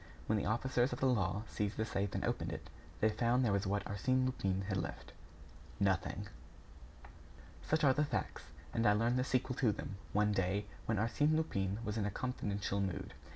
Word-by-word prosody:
When 110 - +2
the - - -2
officers 120 +3 +1
of - - -4
the - - +1
law 105 -5 +2
seized 105 -1 -2
the 110 - +1
safe 100 -2 -2
and - - -1
opened - - -1
it, - - -7 0.3
they 110 - +5
found 120 +4 +2
there 105 - +2
what 100 0 0
Arsène 130 +6 +1
Lupin 95 -7 0
had 95 0 -1
left 70 -8 -5 0.7
nothing. 95 +1 +1 1.4
Such 155 0 +2
are 135 -2 +6
the 150 - +2
facts; 145 - -2 0.3
and 115 +1 +2
I 105 - +6
learned 115 +4 +2
the - - +3
sequel 130 -1 0
to 120 -5 +3
them, 100 0 -5
one 105 +1 +3
day, 100 +1 +1 0.2
when 110 - +1
Arsène 145 +8 +2
Lupin 100 -11 0
was 105 +1 -1
in 100 - 0
a - - +1
confidential 100 -4 -2
mood. 95 -3 -3
105 Hz, 190 wpm, -35 LUFS, 100-125 Hz, 1.4 s, are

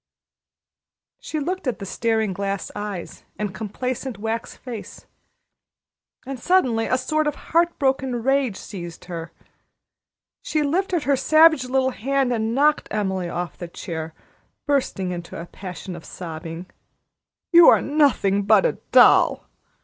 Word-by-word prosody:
She 310 - -4
looked 355 +1 -3
at 250 - -1
the 200 - -7
staring 220 0 0
glass 200 +1 -3
eyes 205 -4 -6
and 205 -1 -3
complacent 240 +5 -4
wax 225 +3 -4
face, 235 -5 -9 1.2
and 270 -1 -6
suddenly 250 -10 +2
a 255 - +2
sort 310 +4 0
of 295 - -1
heartbroken 270 -7 0
rage 270 -6 +1
seized 175 -4 -8
her. 170 -2 -6 1.1
She 305 -1 -1
lifted 350 +2 0
her 285 - 0
little 275 - +3
savage 310 -4 +5 0.3
hand 270 +1 +1
and 225 0 -1
knocked 295 +2 +3
Emily 190 -4 -2
off 175 0 -5
the 175 - -5
chair, 160 -2 -6 0.5
bursting 255 -10 0
into 175 -1 -6
a 170 - -6
passion 180 0 -8
of 170 - -10
sobbing. 165 0 -7 0.9
"You 340 -2 +9
are - - +6
nothing 275 -10 +2
but 210 - +4
a - - 0
doll!" - - +5
230 Hz, 135 wpm, -23 LUFS, 190-280 Hz, 1.2 s, You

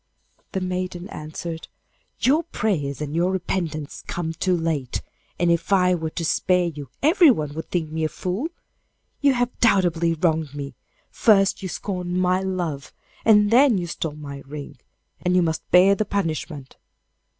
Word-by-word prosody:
The 190 - -1
maiden 185 0 -3
answered, 160 0 -6 0.5
'Your 290 +6 +3
prayers 170 - -2
and 150 0 -4
your 175 +2 +2
repentance 170 -5 -3
come 165 -2 -3
too 180 +2 +1
late, 155 -6 -2 0.3
and 175 -1 +2
if 170 +4 0
I 180 -2 +4
were 160 -2 -2
to 165 +1 -4
spare 180 +2 +2
you 150 -6 -6
everyone 280 - +4
would 160 +2 -6
think 160 -4 -2
me 160 0 -2
a 155 - +1
fool. 190 - -3 0.7
You 280 -2 +4
have 245 0 -1
doubly 175 -6 +3
wronged 160 -3 0
me; 140 -2 -5 0.4
first 195 -4 +3
you 190 - -4
scorned 180 -1 -3
my 185 0 +2
love, 175 -7 -3 0.3
and 210 -1 +5
then 250 -2 +6
you 175 - -2
stole 160 -2 -4
my 140 -2 -8
ring, 145 -3 -8 0.4
and 180 0 +1
you 180 - +4
must 160 -1 -2
bear 185 +2 +6
the 210 +2 0
punishment. 160 -8 -3
175 Hz, 160 wpm, -23 LUFS, 155-190 Hz, 0.7 s, then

